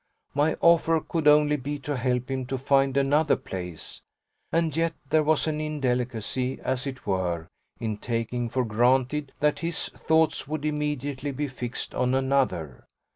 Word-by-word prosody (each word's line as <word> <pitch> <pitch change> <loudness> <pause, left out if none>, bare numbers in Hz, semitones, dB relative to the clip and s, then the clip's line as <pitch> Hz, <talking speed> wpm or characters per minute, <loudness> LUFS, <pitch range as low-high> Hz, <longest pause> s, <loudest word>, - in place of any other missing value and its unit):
My 145 +2 +2
offer 165 -1 +5
could 160 0 -2
only 150 0 +5
be 145 +2 -4
to 145 0 -2
help 125 0 -1
him 130 -1 -2
to 135 - -2
find 135 +1 +2
another 145 +3 +3
place, 90 -3 -7 0.5
and 165 -3 +1
yet 165 0 +1 0.2
there 155 - +5
was 155 0 +2
an 155 -1 -1
indelicacy, 130 -3 -1
as 130 +1 -2
it 130 -1 -7
were, 90 -4 -1 0.3
in 110 -2 -2
taking 120 +1 -2
for 130 +1 0
granted 130 +5 +2
that 150 0 +2
his 170 -1 -3
thoughts 160 -2 +1
would 155 0 -3
immediately 145 -2 -2
be 145 +2 -2
fixed 125 -2 -5
on 125 +1 +1
another. 130 - 0
135 Hz, 155 wpm, -26 LUFS, 125-150 Hz, 0.5 s, offer